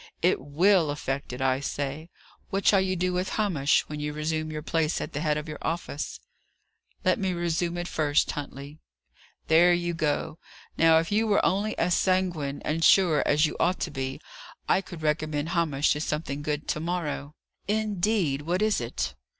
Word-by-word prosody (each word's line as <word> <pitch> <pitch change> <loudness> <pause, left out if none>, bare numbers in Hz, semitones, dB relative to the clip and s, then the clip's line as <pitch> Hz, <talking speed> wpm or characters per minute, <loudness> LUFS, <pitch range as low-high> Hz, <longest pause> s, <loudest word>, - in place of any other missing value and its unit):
It - - +3
will 165 +3 +3
effect 140 -2 -3
it, 125 +1 -6
I 130 0 +2
say. 145 +3 -4 0.4
What 195 0 -2
shall 195 -2 +5
you 190 0 0
do 180 +1 0
with 180 +1 -1
Hamish, 165 -10 +2
when 150 0 -6
you 150 0 -3
resume 155 +1 -2
your 155 -1 -5
place 160 0 0
at - - -5
the 145 - -2
head 150 -1 +1
of 150 +1 -5
your 155 - -7
office?" 160 -3 -4 0.9
"Let - - +3
me 190 -2 0
resume 170 0 -1
it 175 0 -3
first, 150 -3 +1
Huntley." 145 +1 -7 0.7
"There 175 +2 +6
you 175 0 -2
go! 155 0 -1 0.4
Now, 165 0 +5
if 165 +3 0
you 220 +2 +2
were 205 - +3
only 205 +3 0
as 180 - +2
sanguine 175 -8 0
and 160 +2 -1
sure 170 -4 +5
as 150 +2 +4
you 150 - -2
ought 180 +2 +2
to 165 - -2
be, 135 -1 -4 0.5
I 190 - +3
could 175 -4 -10
recommend 155 0 -1
Hamish 160 -5 +1
to 150 - -4
something 150 -2 -3
good 150 0 -3
to - - 0
morrow." 155 -3 -3 0.3
"Indeed! 205 -7 0
What 175 +6 0
is 215 -10 +2
it?" 120 - -3
160 Hz, 185 wpm, -27 LUFS, 150-180 Hz, 0.9 s, There